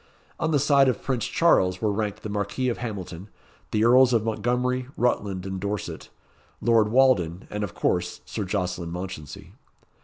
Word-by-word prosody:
On 160 - 0
the 155 - +3
side 140 -1 +4
of 125 - -2
Prince 125 -5 -1
Charles 90 - +3
were 110 -2 +1
ranked 105 0 -3
the 110 - -4
Marquis 105 +5 -1
of 120 - -3
Hamilton, 100 -5 -6 0.4
the 110 +1 +1
Earls 125 +1 +6
of 115 -2 +2
Montgomery, 125 +3 -1
Rutland, 100 -6 0
and 95 -1 -4
Dorset, 100 +1 -4 0.5
Lord 115 -2 +3
Walden, 105 -8 +2
and, 105 0 -3
of 100 - -5
course, 90 0 -1
Sir 110 - -4
Jocelyn 90 -3 -3
Mounchensey. 90 -5 -7
105 Hz, 160 wpm, -25 LUFS, 95-125 Hz, 0.5 s, Earls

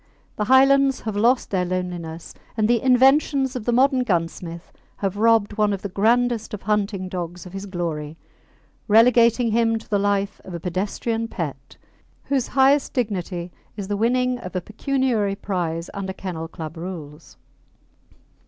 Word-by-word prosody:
The 210 - -1
Highlands 270 +2 +4
have 220 -2 -4
lost 240 +5 +2
their 185 -2 +1
loneliness, 175 -2 -4 0.2
and 215 -1 +2
the 235 0 +2
inventions 265 +1 +3
of 235 -4 -5
the 240 - +1
modern 260 +1 +3
gunsmith 170 -3 -3 0.3
have 195 -1 -2
robbed 220 -1 +2
one 210 -1 +3
of 195 - -5
the 200 - -3
grandest 235 +1 +1
of 205 - -12
hunting 200 -2 -1
dogs 180 -1 -6
of 180 - -11
his 195 +1 -6
glory, 165 -4 -4 0.7
relegating 235 +1 +5
him 225 0 +2
to 225 - -11
the 205 - +1
life 200 0 0
of 180 - -8
a - - -4
pedestrian 205 +6 -2
pet, 140 - -6 0.5
whose 275 -3 0
highest 275 +2 +3
dignity 185 -7 -3 0.3
is 200 -1 -5
the 205 - 0
winning 250 +3 +1
of 180 -5 -9
a - - +1
pecuniary 225 -1 -1
prize 175 -4 -3
under 195 -2 -4
Kennel 175 -4 -5
Club 160 -1 -8
rules. 165 -3 -8
205 Hz, 155 wpm, -23 LUFS, 180-240 Hz, 0.7 s, relegating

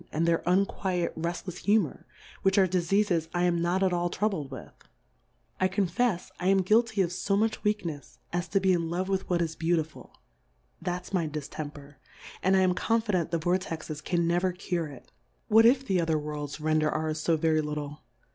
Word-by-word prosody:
139 - - -7
and 165 - +2
their 170 +1 +1
unquiet 185 -2 0
reftlefs 175 +2 -4
Humour, 205 -7 +1 0.3
which 195 +1 +2
are 190 -1 +5
Difeafes 180 -1 +1
I 175 - +2
am 175 -1 +2
not 180 +3 +1
at 185 -1 +2
all 175 0 0
troubled 185 -8 -1
with; 130 -2 -9 0.9
I 185 - +3
confefs 190 +1 0
I 180 - -1
am 195 0 +4
guilty 220 +1 +3
of 175 -1 -3
fo 195 +2 0
much 220 +1 0
Weaknefs, 175 - -3 0.2
as 175 0 -1
to 195 +4 +2
be 190 -1 +3
in 170 -2 0
Love 185 +3 -2
with 190 -1 -1
what 175 -1 +2
is 160 -1 -4
Beautiful; 160 -2 -2 0.7
that'^s 180 +2 -4
my 170 -4 +1
Di 150 0 -4
ftemper, 145 -1 -8 0.4
and 190 +1 +3
I - - +4
am 185 -1 +3
confident 210 -4 0
the 170 - 0
Vor 175 +3 +1
texes 160 -4 -6
can 170 -2 +1
never 175 +2 +1
cure 175 -2 -2
it: 140 -4 -13 0.4
What 225 +1 +7
if 260 +2 +3
the 190 -5 +1
other 160 -1 +1
Worlds 150 -1 -5
render 155 0 +2
ours 155 0 -2
fb 165 -1 +2
very 155 0 +2
little 150 0 -5
175 Hz, 195 wpm, -28 LUFS, 160-190 Hz, 0.9 s, What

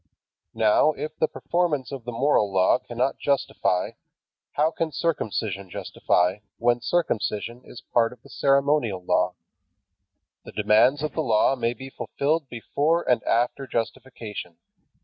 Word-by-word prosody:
Now, 110 +7 +4
if 155 +1 -6
the 155 - +3
performance 160 -8 -1
of 135 -4 -7
the 120 - -4
moral 115 -4 +2
law 95 +5 +4
cannot 125 +3 -2
justify, 135 -9 0 0.6
how 155 +2 +2
can 165 -1 -2
circumcision 110 - -2
justify, 90 +1 0 0.2
when 120 +1 +2
circumcision 120 -6 -1
is 125 - -12
part 115 -1 +3
of 125 -1 -15
the - - -16
ceremonial 140 -8 +2
law? - - +1 1.1
The - - -11
demands 125 +7 +3
of 155 - -1
the 160 - -1
Law 115 0 +3
may 120 -1 -1
be 135 +3 -9
fulfilled 150 +1 -1
before 150 +8 0
and 120 -3 +3
after 120 +4 0
justification. 115 -7 -5
125 Hz, 135 wpm, -25 LUFS, 110-145 Hz, 1.1 s, Now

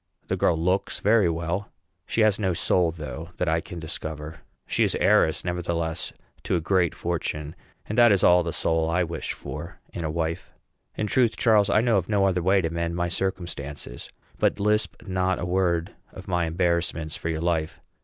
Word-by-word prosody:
The - - +1
girl 85 - +2
looks 90 +4 0
very 105 -3 +4
well; 85 +4 -2 0.4
she 115 - 0
has 110 -2 +4
no 95 -4 0
soul, 85 0 +3
though, 80 0 -7
that 90 - -1
I 80 +1 +2
can 85 0 -8
discover; 80 -1 -5 0.3
she - - +1
is - - +1
heiress, 80 - +3
nevertheless, 85 -2 -2 0.3
to - - -1
a - - +2
great 90 0 +1
fortune, 75 -3 -3 0.3
and 110 - -1
that 120 -2 +7
is 100 - +3
all 90 0 +6
the 85 -1 -3
soul 80 0 +1
I 90 +2 +2
wish 85 -2 -4
for 85 +6 -8 0.2
in 85 - -4
a 80 - -1
wife. 80 +1 -3 0.4
In 110 - -1
truth, 115 +2 +2
Charles, 110 -4 +4
I 105 - +4
know 115 -3 +3
of 95 0 -2
no 100 -2 +3
other 90 -2 +1
way 95 +3 +3
to 80 - -1
mend 85 0 -2
my 85 0 0
circumstances. 85 -8 -4 0.3
But - - +2
lisp 105 +2 0
not 95 -1 0
a - - -3
word 90 -2 0 0.2
of - - -11
my 90 -2 +1
embarrassments 85 -2 0
for 80 - -4
your 80 -1 -2
life. 80 -2 -1
85 Hz, 195 wpm, -25 LUFS, 80-95 Hz, 0.4 s, that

